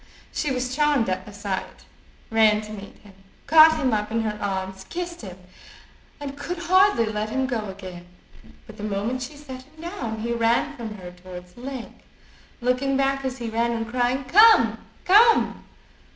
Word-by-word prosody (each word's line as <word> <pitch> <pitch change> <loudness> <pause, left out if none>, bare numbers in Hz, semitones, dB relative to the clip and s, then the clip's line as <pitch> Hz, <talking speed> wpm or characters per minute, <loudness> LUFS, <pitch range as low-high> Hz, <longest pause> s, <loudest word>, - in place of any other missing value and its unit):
She 300 - -1
was 255 -1 -2
charmed 295 -7 +2
at 185 +1 -3
the - - -9
sight, 200 -2 -5 0.5
ran 215 -1 +4
to 215 0 -10
meet 200 -1 -10
him, 205 -2 -16 0.3
caught 315 0 +7
him 260 -6 0
up 210 0 -1
in 225 +1 0
her 215 -1 -2
arms, 190 -1 -3
kissed 345 0 -5
him, 185 -4 -9 0.8
and 280 -1 -6
could 335 +5 -5
hardly 370 - +4
let 215 0 -3
him 265 +3 -1
go 235 -5 -3
again. 185 -2 -9 0.6
But 215 - -13
the 210 - -8
moment 215 +5 -2
she 285 +4 -7
set 265 -3 -9
him 300 +4 -21
down 270 - -5
he 235 +1 -2
ran 235 +5 +1
from 225 -4 -7
her 180 -3 -9
towards 180 0 -12
the 240 - -14
lake, 260 -2 -7 0.6
looking 255 +2 +1
back 275 0 0
as 260 -1 -3
he 235 -2 -5
ran, 235 +1 0
and 225 -1 -3
crying 250 +2 0
"Come, 430 - +6 0.3
come." 440 +5 +4
235 Hz, 180 wpm, -24 LUFS, 210-280 Hz, 0.8 s, caught